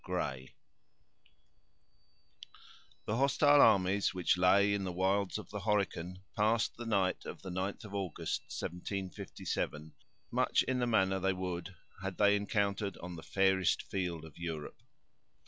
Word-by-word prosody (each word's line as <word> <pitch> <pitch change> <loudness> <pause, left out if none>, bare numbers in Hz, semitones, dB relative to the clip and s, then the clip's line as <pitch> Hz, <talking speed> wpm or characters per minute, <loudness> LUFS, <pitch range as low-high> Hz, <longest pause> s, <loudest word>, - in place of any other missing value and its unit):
—Gray 70 -8 -4 2.5
The 105 - -1
hostile 140 +2 +5
armies, 100 -2 +4
which 90 0 +2
lay 100 +3 +4
in 100 -1 -1
the 95 - -2
wilds 95 +3 +1
of 105 -3 -9
the 105 - -4
Horican, 95 -3 -1
passed 110 +2 +2
the 120 0 -7
night 95 -4 +1
of - - -8
the 95 - -6
ninth 95 +4 -3
of 100 - -10
August, 90 -4 -2
1757, 90 -4 -4 0.4
much - - +2
in 130 -1 -1
the 120 - +1
manner 95 -4 +2
they 95 +1 +1
would, 90 0 -4 0.3
had 95 -1 -4
they 100 0 +5
encountered 100 -1 -1
on 90 0 -7
the 80 - -8
fairest 95 0 +2
field 85 -4 -3
of 80 0 -14
Europe. 80 -3 -5
95 Hz, 140 wpm, -33 LUFS, 90-100 Hz, 2.5 s, hostile